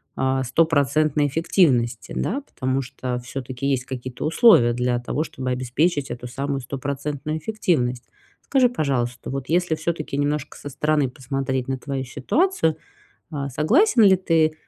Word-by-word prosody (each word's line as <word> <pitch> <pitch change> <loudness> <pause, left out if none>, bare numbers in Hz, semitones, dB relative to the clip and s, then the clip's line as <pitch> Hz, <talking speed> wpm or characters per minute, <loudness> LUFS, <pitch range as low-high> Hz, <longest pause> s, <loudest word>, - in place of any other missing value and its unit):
а, 130 0 0
стопроцентной 150 +1 +2
эффективности, 130 - +1
да? 265 +9 -1
Потому 130 - -2
что 125 -1 -4
всё-таки 130 +1 -6
есть 135 -2 0
какие-то 130 -1 -6
условия 155 - +5
для 125 0 0
того, 140 +5 -2
чтобы 130 -5 -5
обеспечить 135 +5 0
эту 120 0 -6
самую 135 +2 -3
стопроцентную 140 +3 -4
эффективность. 150 - -1 0.4
Скажи, 265 -2 +3
пожалуйста, 125 - -2
вот 135 0 -4
если 175 -1 +2
всё-таки 155 -2 -3
немножко 145 +1 -2
со 145 - -8
стороны 150 0 +1
посмотреть 130 0 -3
на 135 0 -2
твою 135 0 -4
ситуацию, 160 - 0 0.5
а, 140 -2 -3
согласен 235 - +3
ли 195 -2 +7
ты 165 -4 +2
140 Hz, 140 wpm, -23 LUFS, 130-155 Hz, 0.5 s, ли